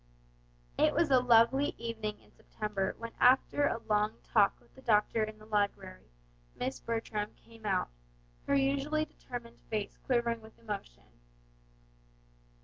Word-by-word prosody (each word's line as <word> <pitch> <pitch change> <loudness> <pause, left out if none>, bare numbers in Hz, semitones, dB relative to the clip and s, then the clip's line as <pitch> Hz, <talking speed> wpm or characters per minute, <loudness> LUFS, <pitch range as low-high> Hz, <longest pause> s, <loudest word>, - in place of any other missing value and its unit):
It - - +4
was 325 -2 +2
a 260 - +7
lovely 245 +3 +4
evening 220 -2 -4
in - - -23
September 205 -3 -3
when 230 0 -6
after 265 +3 +5
a 230 - -2
long 210 0 +1
talk - - +3
with - - -26
the 265 - -15
doctor 220 -1 +2
in 215 0 -5
the 215 - -15
library 200 - -1 0.5
Miss 130 +1 -3
Bertram 225 -2 -3
came 225 -2 -11
out, 190 -2 +1 0.6
her - - +3
usually 280 +3 +1
determined 240 -5 -9
face 210 -2 -3
quivering 235 -2 +1
with 220 0 -15
emotion. 60 - -7
225 Hz, 140 wpm, -32 LUFS, 210-250 Hz, 0.6 s, a